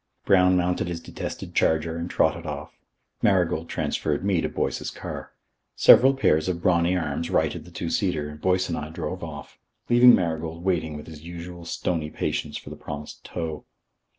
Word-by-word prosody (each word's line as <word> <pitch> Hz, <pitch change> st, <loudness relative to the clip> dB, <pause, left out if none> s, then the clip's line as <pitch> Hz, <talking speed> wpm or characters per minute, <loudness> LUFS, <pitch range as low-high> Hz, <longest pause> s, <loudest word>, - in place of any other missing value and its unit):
Brown 90 Hz, -1 st, +5 dB
mounted 90 Hz, 0 st, 0 dB
his 85 Hz, -1 st, -3 dB
detested -, -, -7 dB
charger 80 Hz, +1 st, +2 dB
and 85 Hz, +1 st, -4 dB
trotted 85 Hz, -1 st, +1 dB
off. 75 Hz, 0 st, -5 dB, 0.5 s
Marigold 90 Hz, -4 st, +2 dB
transferred 75 Hz, +4 st, -1 dB
me 95 Hz, -5 st, +2 dB
to -, -, -1 dB
Boyce's -, -, -2 dB
car. -, -, -7 dB, 0.4 s
Several 135 Hz, +2 st, +7 dB
pairs 80 Hz, -, +2 dB
of 85 Hz, -2 st, -1 dB
brawny 85 Hz, 0 st, +2 dB
arms 80 Hz, -1 st, -2 dB
righted -, -, 0 dB
the -, -, -12 dB
two -, -, -4 dB
seater 85 Hz, -6 st, 0 dB
and 75 Hz, 0 st, -10 dB
Boyce 95 Hz, 0 st, +2 dB
and 85 Hz, -, -2 dB
I 75 Hz, -, -6 dB
drove 90 Hz, +3 st, -5 dB
off, 75 Hz, -3 st, -8 dB, 0.3 s
leaving 120 Hz, +1 st, +8 dB
Marigold 80 Hz, -1 st, -2 dB
waiting 80 Hz, -5 st, 0 dB
with 75 Hz, -, -9 dB
his 80 Hz, -2 st, -11 dB
usual 85 Hz, +1 st, -8 dB
stony 85 Hz, -2 st, -2 dB
patience -, -, -3 dB
for -, -, -10 dB
the -, -, -6 dB
promised 75 Hz, 0 st, -8 dB
tow. 80 Hz, -3 st, -5 dB
85 Hz, 175 wpm, -25 LUFS, 80-90 Hz, 0.5 s, leaving